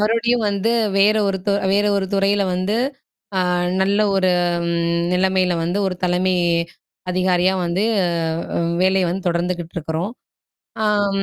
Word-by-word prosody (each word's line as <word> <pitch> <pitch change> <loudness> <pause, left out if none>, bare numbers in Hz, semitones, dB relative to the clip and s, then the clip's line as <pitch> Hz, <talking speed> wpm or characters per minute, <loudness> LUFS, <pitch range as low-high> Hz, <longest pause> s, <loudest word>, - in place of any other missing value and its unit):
மறுபடியும் 230 +2 +1
வந்து 200 +2 0 0.3
வேற 210 +2 +4
ஒரு 195 -1 -1
து 200 - +2 0.2
வேற 205 +1 +2
ஒரு 195 - -1
துறையில 200 +1 +2
வந்து 185 +4 -1 0.6
அ - - +3 0.4
நல்ல 200 +2 +1 0.2
ஒரு 185 -1 +2 0.4
ம் 170 0 0 0.2
நிலைமையில 185 0 +2
வந்து 175 +4 -1
ஒரு 190 - -2
தலைமை 180 +1 +1 0.8
அதிகாரியா 185 0 +2
வந்து 175 +4 0 0.2
அ 165 -1 -2
உ - - 0 0.2
வேலையை 190 0 +3
வந்து 185 +2 -4
தொடர்ந்துகிட்டு 175 0 -2
இருக்கிறோம். 160 +4 -3 0.7
அம் 205 -2 +1
185 Hz, 140 wpm, -20 LUFS, 175-200 Hz, 0.8 s, வேற